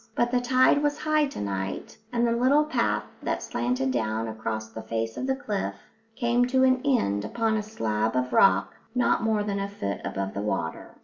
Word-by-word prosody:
But 240 Hz, 0 st, +1 dB
the 250 Hz, -1 st, +2 dB
tide 255 Hz, +3 st, +4 dB
was 290 Hz, 0 st, +1 dB
high 310 Hz, -1 st, +2 dB
to -, -, -8 dB
night, 95 Hz, -1 st, -4 dB, 0.2 s
and 240 Hz, -1 st, +1 dB
the 235 Hz, -, +2 dB
little 260 Hz, +6 st, +3 dB
path 305 Hz, -, 0 dB, 0.2 s
that -, -, -2 dB
slanted 125 Hz, +2 st, -1 dB
down 110 Hz, -2 st, -1 dB
across 110 Hz, 0 st, -4 dB
the 110 Hz, +1 st, -8 dB
face 115 Hz, 0 st, -3 dB
of 260 Hz, -, -3 dB
the 265 Hz, -, +1 dB
cliff 205 Hz, -, -3 dB, 0.4 s
came 240 Hz, +1 st, +2 dB
to 260 Hz, +1 st, +3 dB
an 255 Hz, -1 st, +4 dB
end 100 Hz, -, +1 dB
upon 220 Hz, -, 0 dB
a 215 Hz, -, 0 dB
slab 110 Hz, -, -1 dB
of 125 Hz, 0 st, 0 dB
rock 195 Hz, -, +4 dB, 0.2 s
not 245 Hz, 0 st, +2 dB
more 220 Hz, -2 st, +1 dB
than 200 Hz, -1 st, -2 dB
a 200 Hz, 0 st, -2 dB
foot 100 Hz, -, -4 dB
above 95 Hz, 0 st, -3 dB
the 100 Hz, -, -3 dB
water. 95 Hz, -6 st, -3 dB
200 Hz, 200 wpm, -26 LUFS, -, 0.4 s, tide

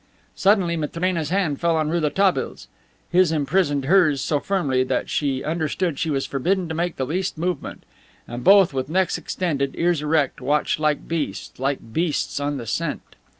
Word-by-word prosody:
Suddenly 190 Hz, -4 st, +2 dB
Matrena's 165 Hz, 0 st, -1 dB
hand 175 Hz, -6 st, 0 dB
fell 170 Hz, -1 st, +2 dB
on 155 Hz, -1 st, 0 dB
Rouletabille's. 175 Hz, +4 st, 0 dB, 0.4 s
His 180 Hz, -2 st, +4 dB
imprisoned 145 Hz, -2 st, +1 dB
hers 160 Hz, -4 st, +4 dB
so 145 Hz, +3 st, 0 dB
firmly 140 Hz, -9 st, 0 dB
that 130 Hz, -1 st, -2 dB
she 135 Hz, -3 st, -1 dB
understood 160 Hz, 0 st, -1 dB
she 160 Hz, -, -1 dB
was 135 Hz, -3 st, 0 dB
forbidden 180 Hz, +7 st, 0 dB
to -, -, -3 dB
make 170 Hz, +1 st, -2 dB
the 130 Hz, -, -2 dB
least 180 Hz, +4 st, -2 dB
movement. 175 Hz, +2 st, -3 dB, 0.4 s
And 120 Hz, +1 st, -6 dB
both, 195 Hz, -3 st, +6 dB
with 130 Hz, +1 st, -3 dB
necks 185 Hz, +2 st, +1 dB
extended, 140 Hz, -7 st, -2 dB
ears 170 Hz, -2 st, +1 dB
erect, 150 Hz, -3 st, 0 dB
watched 145 Hz, +4 st, +1 dB
like 150 Hz, -1 st, 0 dB
beasts, 165 Hz, -6 st, -4 dB
like 135 Hz, -4 st, -3 dB
beasts 160 Hz, -3 st, -1 dB
on 145 Hz, 0 st, -2 dB
the 120 Hz, -, -6 dB
scent. -, -, -4 dB
155 Hz, 165 wpm, -22 LUFS, 140-175 Hz, 0.4 s, both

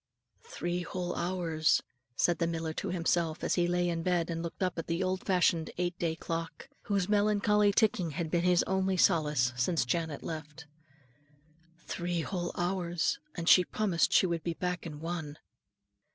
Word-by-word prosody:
"Three 180 Hz, -, -3 dB
whole 175 Hz, 0 st, -4 dB
hours," 170 Hz, -3 st, +1 dB, 0.3 s
said 175 Hz, +7 st, +2 dB
the 170 Hz, -, +1 dB
miller 165 Hz, -1 st, -3 dB
to -, -, -4 dB
himself 170 Hz, -2 st, 0 dB
as -, -, +1 dB
he 175 Hz, -1 st, +2 dB
lay 175 Hz, 0 st, +1 dB
in 170 Hz, -1 st, -1 dB
bed 175 Hz, -1 st, 0 dB
and 165 Hz, 0 st, -3 dB
looked 170 Hz, +3 st, -4 dB
up 180 Hz, -2 st, -1 dB
at 165 Hz, -, -5 dB
the 170 Hz, +3 st, 0 dB
old 185 Hz, 0 st, -1 dB
fashioned 180 Hz, -3 st, +2 dB
eight 175 Hz, 0 st, -1 dB
day 165 Hz, -2 st, 0 dB
clock, 165 Hz, +6 st, -5 dB, 0.2 s
whose 200 Hz, -4 st, 0 dB
melancholy 210 Hz, 0 st, +3 dB
ticking 200 Hz, -5 st, +2 dB
had 160 Hz, +1 st, -4 dB
been 175 Hz, -, +2 dB
his 180 Hz, -1 st, +4 dB
only 190 Hz, 0 st, 0 dB
solace 150 Hz, -8 st, +3 dB
since 140 Hz, +6 st, +1 dB
Janet 160 Hz, +3 st, -2 dB
left, 155 Hz, 0 st, -7 dB, 1.1 s
"three 175 Hz, 0 st, -3 dB
whole 175 Hz, 0 st, -3 dB
hours, 175 Hz, -1 st, 0 dB, 0.2 s
and 170 Hz, -1 st, -4 dB
she 180 Hz, -, +8 dB
promised 185 Hz, -4 st, +1 dB
she -, -, +5 dB
would 170 Hz, -2 st, -1 dB
be 170 Hz, 0 st, -3 dB
back 180 Hz, 0 st, -3 dB
in 150 Hz, -2 st, -8 dB
one." 160 Hz, -3 st, -4 dB
175 Hz, 170 wpm, -30 LUFS, 165-180 Hz, 1.1 s, she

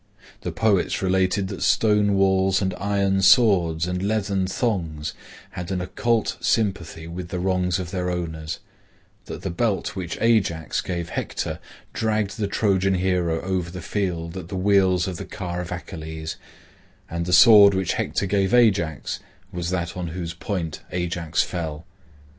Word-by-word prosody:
The -, -, -3 dB
poets 100 Hz, -4 st, +1 dB
related 95 Hz, +1 st, +1 dB
that 100 Hz, -, -6 dB
stone 105 Hz, +4 st, +3 dB
walls 95 Hz, 0 st, +3 dB
and 95 Hz, -2 st, -1 dB
iron 100 Hz, -1 st, +1 dB
swords 90 Hz, -8 st, +4 dB
and 90 Hz, 0 st, -2 dB
leathern 100 Hz, -2 st, 0 dB
thongs 80 Hz, -9 st, -2 dB, 0.4 s
had 90 Hz, -1 st, -6 dB
an 95 Hz, -2 st, -1 dB
occult 115 Hz, +5 st, 0 dB
sympathy 90 Hz, -7 st, 0 dB
with 85 Hz, +1 st, -6 dB
the 90 Hz, -, -3 dB
wrongs 90 Hz, 0 st, +1 dB
of 90 Hz, -2 st, -5 dB
their 90 Hz, -2 st, -2 dB
owners; 80 Hz, -3 st, -4 dB, 0.7 s
that -, -, -8 dB
the 95 Hz, -, -2 dB
belt 100 Hz, +3 st, -1 dB
which 90 Hz, -3 st, -4 dB
Ajax 100 Hz, -8 st, +1 dB
gave 85 Hz, -2 st, -4 dB
Hector -, -, -3 dB, 0.3 s
dragged 110 Hz, -1 st, -1 dB
the 105 Hz, -, 0 dB
Trojan 95 Hz, -2 st, +1 dB
hero 90 Hz, -3 st, 0 dB
over 90 Hz, -2 st, -2 dB
the 90 Hz, +1 st, -7 dB
field 85 Hz, -2 st, -3 dB
at 90 Hz, -3 st, -6 dB
the 95 Hz, -, -6 dB
wheels 95 Hz, -2 st, +3 dB
of 90 Hz, -2 st, -4 dB
the -, -, -5 dB
car 90 Hz, -3 st, -5 dB
of 90 Hz, -, -7 dB
Achilles, 80 Hz, -3 st, -6 dB, 0.7 s
and 85 Hz, +1 st, -4 dB
the -, -, -1 dB
sword 100 Hz, +1 st, +8 dB
which 95 Hz, -2 st, 0 dB
Hector -, -, -1 dB
gave 100 Hz, +2 st, +2 dB
Ajax 95 Hz, -10 st, +2 dB, 0.3 s
was 90 Hz, -2 st, -3 dB
that 90 Hz, -2 st, -2 dB
on 90 Hz, -1 st, -4 dB
whose 85 Hz, 0 st, -5 dB
point 85 Hz, -2 st, -4 dB
Ajax 85 Hz, -2 st, 0 dB
fell. 80 Hz, -2 st, -5 dB
90 Hz, 155 wpm, -23 LUFS, 85-100 Hz, 0.7 s, sword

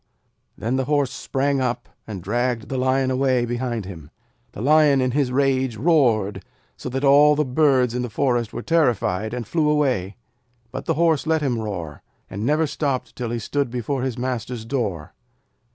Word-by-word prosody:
Then 120 Hz, +5 st, -1 dB
the 130 Hz, -, 0 dB
Horse 145 Hz, -2 st, +1 dB
sprang 135 Hz, 0 st, -1 dB
up, 125 Hz, -2 st, -2 dB, 0.2 s
and 100 Hz, -5 st, -6 dB
dragged 120 Hz, +3 st, -1 dB
the 135 Hz, -, -2 dB
Lion 130 Hz, 0 st, +1 dB
away 130 Hz, -2 st, +2 dB
behind 120 Hz, -3 st, -3 dB
him. 80 Hz, -6 st, -10 dB, 0.4 s
The -, -, -7 dB
Lion 150 Hz, -1 st, +5 dB
in 130 Hz, -1 st, +1 dB
his 135 Hz, -1 st, 0 dB
rage 130 Hz, -3 st, +1 dB
roared, 110 Hz, -, +2 dB, 0.3 s
so -, -, -6 dB
that 135 Hz, +2 st, -3 dB
all 145 Hz, +2 st, +6 dB
the 150 Hz, +1 st, +1 dB
birds 130 Hz, -3 st, +2 dB
in 125 Hz, -, -1 dB
the 125 Hz, -, -3 dB
forest 120 Hz, -1 st, 0 dB
were -, -, -6 dB
terrified, 115 Hz, -, +1 dB
and 120 Hz, -1 st, -4 dB
flew 155 Hz, -3 st, +1 dB
away. 130 Hz, -11 st, 0 dB, 0.6 s
But 130 Hz, -, -6 dB
the -, -, 0 dB
Horse 160 Hz, -2 st, +2 dB
let 160 Hz, -1 st, +1 dB
him 125 Hz, -5 st, 0 dB
roar, 85 Hz, -9 st, -5 dB, 0.3 s
and 100 Hz, +2 st, -4 dB
never 150 Hz, +5 st, +2 dB
stopped 140 Hz, -3 st, -2 dB
till 120 Hz, -2 st, -4 dB
he 120 Hz, -, -2 dB
stood 140 Hz, +4 st, -2 dB
before 125 Hz, +2 st, -3 dB
his 130 Hz, -2 st, -2 dB
master's 125 Hz, -2 st, -4 dB
door. 105 Hz, -, -3 dB
130 Hz, 180 wpm, -22 LUFS, 115-140 Hz, 0.6 s, all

